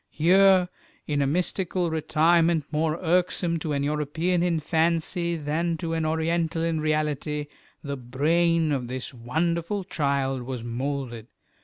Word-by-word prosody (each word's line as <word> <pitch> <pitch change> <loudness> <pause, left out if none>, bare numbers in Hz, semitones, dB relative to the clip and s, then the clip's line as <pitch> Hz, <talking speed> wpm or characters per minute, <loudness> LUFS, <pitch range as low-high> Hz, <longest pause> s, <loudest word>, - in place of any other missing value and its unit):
Here, 185 +2 +5 0.4
in 145 -1 0
a 140 - +2
mystical 180 +2 -1
retirement 160 0 +2
more 155 +1 0
irksome 175 0 +1
to 155 0 -4
an 140 0 0
European 150 +4 0
in 170 -2 +1
fancy 170 +2 0
than 165 +2 -1
to 165 0 -3
an 160 -1 0
Oriental 165 +1 0
in 165 -2 0
reality, 150 -1 -1 0.4
the 140 -1 -4
brain 160 +6 +1
of 130 -4 -1
this 130 +2 -5
wonderful 170 - -1
child 140 -6 -1
was 125 -1 -5
moulded. 120 -1 -4
160 Hz, 135 wpm, -25 LUFS, 145-170 Hz, 0.4 s, Here